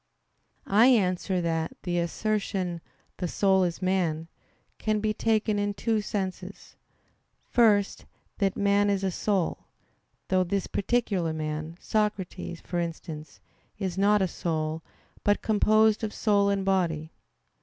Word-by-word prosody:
I 215 +5 +5
answer 185 -5 +2
that, 165 -1 -2
The 175 -2 0
assertion 185 -1 -2 0.4
"the 180 - -2
soul 190 +1 +3
is 175 +1 -2
man," 170 -4 0 0.5
can 215 -1 0
be 215 0 0
taken 215 -1 +1
in 205 0 -1
two 220 0 0
senses. 195 -2 -5 0.8
First, 210 -5 +3 0.3
that 195 -2 +1
man 200 0 +3
is 195 -1 0
a 190 - +1
soul; 190 -1 -1 0.6
though 185 -1 +3
this 190 +1 -1
particular 200 -7 0
man, 155 +1 -4
Socrates, 210 -5 -2
for 175 - -3
instance, 160 -3 -6 0.4
is 185 -3 -3
not 200 +1 +3
a - - +2
soul, 160 -2 -2 0.4
but 205 0 +2
composed 215 0 +3
of 215 - -3
soul 200 -2 +3
and 195 -1 0
body. 165 -5 0
195 Hz, 130 wpm, -27 LUFS, 170-210 Hz, 0.8 s, I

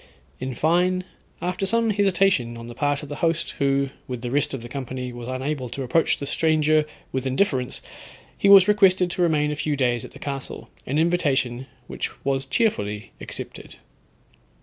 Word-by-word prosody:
In 130 0 -4
fine, 180 +5 +2 0.4
after 180 +2 -1
some 230 +1 +3
hesitation 190 - +2
on 115 - -8
the 120 - -8
part 145 +3 -1
of 145 - -8
the 145 - -5
host, 165 0 0
who, 140 -1 +1 0.2
with 125 -2 -5
the 120 - -3
rest 145 +1 +1
of 135 -4 -5
the - - -7
company, 125 -1 -5
was 120 0 -8
unable 130 0 -3
to 135 - -4
approach 155 +6 +2
the 140 - -4
stranger 155 0 +2 0.3
with 130 0 -2
indifference, 130 -2 0 0.5
he 200 - +2
was 195 -1 +9
requested 190 -3 +4
to 180 - -2
remain 150 -3 +2
a - - -2
few 150 0 -1
days 120 -4 +1
at - - -8
the - - -11
castle, 140 -2 -6 0.2
an 140 - 0
invitation 140 -7 +1 0.2
which - - -4 0.2
was 135 0 0
cheerfully 105 - -1
accepted. - - -6
145 Hz, 175 wpm, -24 LUFS, 130-175 Hz, 0.5 s, was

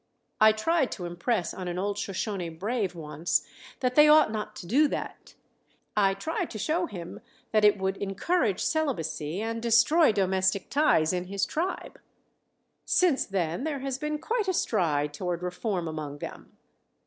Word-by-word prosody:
I 215 0 +7
tried 270 +6 +1
to 180 - -6
impress 175 +2 -1
on 185 -1 -6
an 175 0 -3
old 200 +2 -1
Shoshone 195 -2 -3
brave 195 +3 -2
once 160 +1 -1 0.4
that 250 -1 +1
they 300 +3 +7
ought 305 -6 +6
not 215 -1 -4
to - - -8
do 275 - +4
that. - - -6 0.6
I 195 -2 +3
tried 320 - -3
to 220 - -7
show 335 - 0
him 175 - -8 0.3
that 215 -1 +3
it 210 0 +6
would 190 0 -1
encourage 200 - 0
celibacy 180 - -1
and 230 0 -3
destroy 235 +7 +5
domestic 190 -1 0
ties 230 - +3
in 180 0 -2
his 195 +1 -1
tribe. 350 +5 -4 0.8
Since 345 -7 +2
then 175 +1 -2
there 290 -3 -3
has 270 -1 -3
been 300 +1 -2
quite 425 +7 -2
a 375 - +1
stride 150 - 0
toward 175 +2 -3
reform 180 0 -2
among 155 -2 -5
them. - - -9
205 Hz, 160 wpm, -27 LUFS, 180-275 Hz, 0.8 s, I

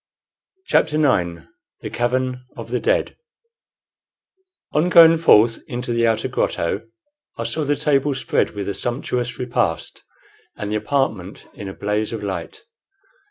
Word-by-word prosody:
CHAPTER 155 - +2
IX 90 - +1 0.4
THE - - -6
CAVERN 125 +1 -1
OF - - -8
THE - - 0
DEAD - - 0 1.6
On 155 +4 +2
going 165 -1 +8
forth 115 -8 +5
into 120 -1 -3
the 115 0 +2
outer 110 -1 +1
grotto 100 +6 -2 0.5
I - - -3
saw 155 -2 -2
the 145 +1 +1
table 145 -1 +1
spread 130 - 0
with 100 -1 -4
a 100 - -1
sumptuous 120 0 -2
repast, 120 -9 -2 0.6
and 105 0 -4
the - - 0
apartment 105 -6 -2
in 100 - -8
a 95 - -7
blaze 105 +1 -2
of 110 -2 -5
light. 260 - -5
120 Hz, 140 wpm, -21 LUFS, 105-145 Hz, 1.6 s, going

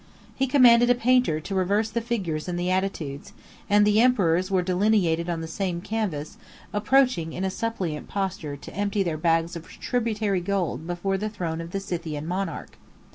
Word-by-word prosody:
He 270 - +1
commanded 245 -3 +6
a 245 - +5
painter 245 -9 +2
to 175 +6 -6
reverse 200 +4 +1
the 235 - -1
figures 190 -10 -3
and 175 -1 -2
the 180 +1 0
attitudes; 180 -7 -3 0.4
and 205 0 +5
the 210 +1 +4
emperors 185 -7 +3
were 190 -2 +2
delineated 180 -3 +2
on 165 -1 -2
the 160 - -5
same 175 0 -2
canvas, 195 -4 -3 0.4
approaching 210 - +2
in 185 - -4
a 190 - 0
suppliant 185 -9 -3
posture 185 -7 -3
to - - -11
empty 200 0 0
their 170 -4 -2
bags 165 +1 +1
of 165 -1 -8
tributary 215 -5 -1
gold 175 -6 -2
before 190 +2 -1
the 215 +2 -2
throne 165 -6 -4
of 165 - -7
the 195 - -3
Scythian 165 -5 -4
monarch. 180 -1 -4
190 Hz, 180 wpm, -25 LUFS, 165-215 Hz, 0.4 s, commanded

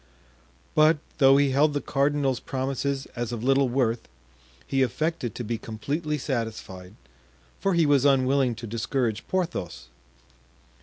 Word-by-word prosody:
But, 155 +1 +5 0.2
though 135 -1 +7
he 140 -1 +3
held 145 +2 +3
the - - +1
cardinal's 140 -2 0
promises 135 -1 -2
as 120 -1 -3
of 120 -2 -4
little 135 0 +3
worth, 120 -2 0 0.6
he 135 - 0
affected 130 -1 -1
to 120 - -4
be 115 0 -3
completely 150 +9 -3
satisfied, 110 -8 -5 0.6
for 195 -2 +1
he 170 -2 +4
was 145 -3 +4
unwilling 135 -2 +3
to 115 - -8
discourage 115 0 -2
Porthos. 165 - -3
135 Hz, 135 wpm, -26 LUFS, 115-145 Hz, 0.6 s, though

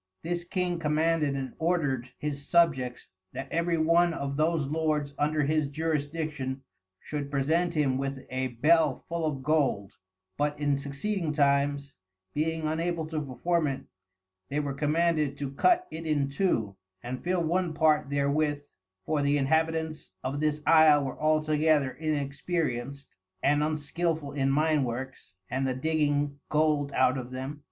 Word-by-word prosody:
This 175 +1 -2
King 180 -1 -2
commanded 155 -2 +1
and 135 -2 -4
ordered 145 -7 0
his 145 -1 -4
Subjects, 140 -8 +2 0.2
that 135 +1 -6
every 170 0 +1
one 165 +1 +3
of 140 0 -3
those 155 0 +1
Lords 150 -1 -1
under 150 +1 +1
his 150 0 +1
Jurisdiction, 150 -3 -2 0.4
should 145 -2 -5
present 160 +5 +1
him 135 -4 +1
with 135 -1 -4
a 130 0 -1
Bell 150 +4 +2
full 170 -1 -1
of 135 -3 -3
Gold; 130 -11 0 0.4
but 145 0 -1
in 145 -1 +2
succeeding 155 +5 -2
times, 140 0 +1 0.4
being 160 +1 -1
unable 165 +1 -1
to 155 -1 -2
perform 155 +5 0
it, 135 -1 -3 0.7
they 145 - -1
were 145 -2 -2
commanded 150 0 +1
to 140 -2 -4
cut 360 - +3
it 160 +1 -6
in 145 -3 +1
two, 130 - 0 0.3
and 125 +1 -5
fill 180 -1 +1
one 170 0 0
part 155 -3 +3
therewith, 145 +1 0 0.4
for 155 -2 0
the 145 +1 +2
Inhabitants 160 +2 0
of 135 +3 -2
this 150 0 0
Isle 155 -3 +6
were 135 - -6
altogether 155 -2 +2
inexperienced, 140 -3 -3 0.3
and 145 +1 +3
unskilful 155 0 -1
in 135 -1 0
Mine 150 +1 +2
works, 125 -5 -6
and 135 +4 -1
the 130 - -1
digging 145 -1 0
Gold 150 -2 +2
out 130 +1 +3
of 125 -1 -7
them. 130 +3 -6
150 Hz, 145 wpm, -28 LUFS, 140-160 Hz, 0.7 s, Isle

